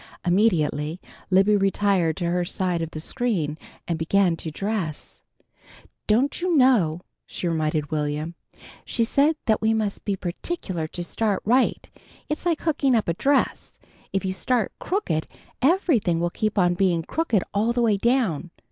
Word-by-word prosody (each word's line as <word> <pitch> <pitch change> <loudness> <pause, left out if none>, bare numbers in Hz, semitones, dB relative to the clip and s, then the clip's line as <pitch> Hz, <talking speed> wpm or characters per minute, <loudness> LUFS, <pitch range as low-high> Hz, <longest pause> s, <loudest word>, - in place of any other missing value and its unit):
Immediately 175 -4 +1 0.3
Libby 195 +2 +4
retired 195 -4 +1
to 170 -2 -1
her 180 0 +1
side 180 -1 -1
of 165 - -3
the 160 - -7
screen 170 -5 -1 0.3
and 170 -2 -2
began 175 +1 +2
to 160 - -5
dress. 190 -2 -4 0.9
"Don't 250 +10 +2
you 355 -1 +1
know," 205 - +4 0.3
she 180 - -4
reminded 155 -2 -1
Will'm, 150 +2 -2 0.5
"she 235 - 0
said 280 +7 +3
that 220 -3 +2
we 220 0 +2
must 210 -2 -2
be 200 - -1
particular 180 - -4
to 175 +2 -5
start 205 +3 -1
right. 250 +5 +2 0.4
It's 305 +3 -2
like 335 -3 +1
hooking 280 -5 +2
up 220 - +1
a 170 - +1
dress. 275 - 0 0.3
If 195 0 -1
you 185 - -1
start 220 +5 0
crooked, 260 - -1 0.3
everything 265 - +2
will 175 0 0
keep 215 +2 -2
on 175 -2 +4
being 175 -2 +1
crooked 240 - 0
all 215 +4 +2
the 240 0 +1
way 215 -3 +3
down. 215 - +1
195 Hz, 155 wpm, -24 LUFS, 170-235 Hz, 0.9 s, Libby